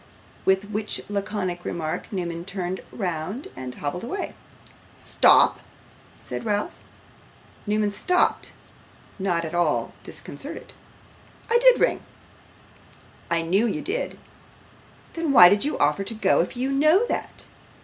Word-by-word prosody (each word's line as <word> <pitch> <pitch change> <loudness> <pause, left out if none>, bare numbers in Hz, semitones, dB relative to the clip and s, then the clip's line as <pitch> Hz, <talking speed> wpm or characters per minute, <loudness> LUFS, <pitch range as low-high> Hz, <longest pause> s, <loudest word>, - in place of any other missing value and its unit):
With 190 +2 +2
which 210 0 -2
laconic 195 -3 -3
remark 160 -2 -4
Newman 170 -4 -3
turned 185 -1 -4
round 185 - -4
and 130 -1 -7
hobbled 150 +5 -4
away. 325 +12 -4 0.6
'Stop!' - - +4 0.6
said - - -6
Ralph. 210 -2 -1 0.9
Newman 210 0 +1
stopped; 360 - +1 0.7
not 175 -3 0
at 160 - -6
all 175 -4 0
disconcerted. - - -8 0.8
'I 470 - +5
did - - +6
ring.' - - +2 1.3
'I 170 -1 +1
knew 195 +8 +2
you 215 - -3
did.' 440 +7 -3 1.0
'Then 330 -3 -1
why 180 -7 +10
do 205 +7 +2
you 300 - -2
offer 150 +7 +2
to 225 +3 -4
go 200 -3 +2
if 180 +8 -4
you 260 +2 -1
know 310 +10 +4
that? - - -4
200 Hz, 125 wpm, -24 LUFS, 175-240 Hz, 1.3 s, why